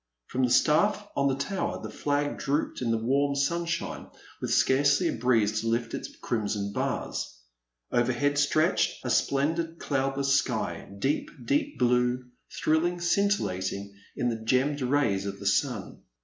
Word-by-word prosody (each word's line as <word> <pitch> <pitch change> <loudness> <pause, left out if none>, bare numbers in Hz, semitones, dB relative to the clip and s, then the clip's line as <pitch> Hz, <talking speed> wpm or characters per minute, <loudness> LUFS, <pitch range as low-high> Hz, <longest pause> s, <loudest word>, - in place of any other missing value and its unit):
From 130 - -2
the 125 - +3
staflF 205 +11 +3
on 140 - +2
the 135 - +1
tower 180 +8 -2
the - - -7
flag 145 0 -1
drooped 145 0 -1
in 120 - -1
the 115 - +2
warm 140 +5 +1
sunshine 170 +4 -1 0.3
with - - -2
scarcely 140 +1 +3
a - - -1
breeze 110 -3 +2
to 115 - -4
lift 115 +1 -1
its - - -4
crimson 105 -3 -2
bars. - - -3 0.5
Overhead 130 +4 +1
stretched 155 0 +1
a 125 - 0
splendid 160 +7 +1
cloudless 135 -1 0
sky, 130 -5 -1
deep, 145 - 0 0.2
deep 290 0 0
blue, 125 +1 +2 0.2
thrilling, 170 +3 +1
scintil 200 +4 +2
lating 95 +2 -4 0.3
in 120 - +1
the 115 -1 -4
gemmed 135 +5 +1
rays 125 -7 +1
of 100 0 -5
the - - -9
sun. - - 0
135 Hz, 150 wpm, -28 LUFS, 120-150 Hz, 0.5 s, the